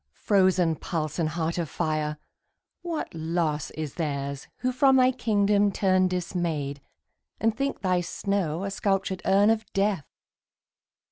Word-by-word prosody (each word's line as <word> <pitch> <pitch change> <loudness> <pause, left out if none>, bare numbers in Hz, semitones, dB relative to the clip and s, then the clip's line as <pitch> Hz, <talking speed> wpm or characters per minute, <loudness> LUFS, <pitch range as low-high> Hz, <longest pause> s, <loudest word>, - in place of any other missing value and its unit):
frozen 185 -5 +3
pulse 155 0 -3
and 160 -2 +1
heart 165 +1 -2
of 165 -3 -2
fire, 155 -1 -1 0.6
What 340 -3 -4
loss 160 -2 -1
is 155 -2 -5
theirs 140 -4 -3
who 255 - +1
from 265 +1 +4
thy 255 0 +5
kingdom 205 -4 +2
turn 185 -1 +3
Dismayed, 170 -6 -2 0.6
and 225 0 +1
think 275 +3 -2
thy 185 -2 +2
snow 175 -1 -2
a 195 - -3
sculptured 195 -1 -1
urn 200 +3 +5
Of 225 -1 0
death! 195 -6 0
180 Hz, 135 wpm, -26 LUFS, 155-205 Hz, 0.6 s, thy